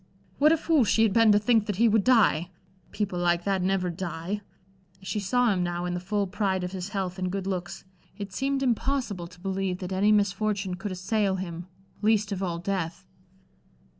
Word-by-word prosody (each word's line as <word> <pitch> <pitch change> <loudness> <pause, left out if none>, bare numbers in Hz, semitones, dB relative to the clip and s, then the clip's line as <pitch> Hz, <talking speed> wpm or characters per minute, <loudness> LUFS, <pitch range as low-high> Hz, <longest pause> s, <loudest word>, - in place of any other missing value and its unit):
What 300 +2 +6
a 325 - +4
fool 315 -3 +3
she 225 0 +3
had 215 -3 +3
been 225 -1 +6
to 205 - +6
think 215 0 +2
that 205 - -1
he 230 +5 +4
would 220 -2 +3
die! 200 -9 +4 0.4
People 195 -4 -3
like 175 0 +1
that 195 -1 0
never 185 -1 0
die. 175 +2 -4 0.6
As 190 - -12
she 215 - -1
saw 240 +3 +2
him 185 - -1
now, 175 0 -2
in 180 - -2
the 180 - -2
full 200 +3 -1
pride 190 -1 -1
of 180 - -3
his 190 0 -5
health 190 -2 -3
and 185 -1 -1
good 195 -1 -3
looks, 185 -2 -4 0.3
it 200 -2 -6
seemed 275 +4 -1
impossible 245 -7 -1
to 180 +1 -17
believe 190 -1 -2
that 185 0 -6
any 200 +3 +3
misfortune 200 -1 +1
could 195 +3 -5
assail 190 +2 0
him 175 -2 -6 0.3
least 215 -1 +2
of 195 -1 -3
all 175 -3 -2
death! 180 0 -3
195 Hz, 200 wpm, -27 LUFS, 180-215 Hz, 0.6 s, What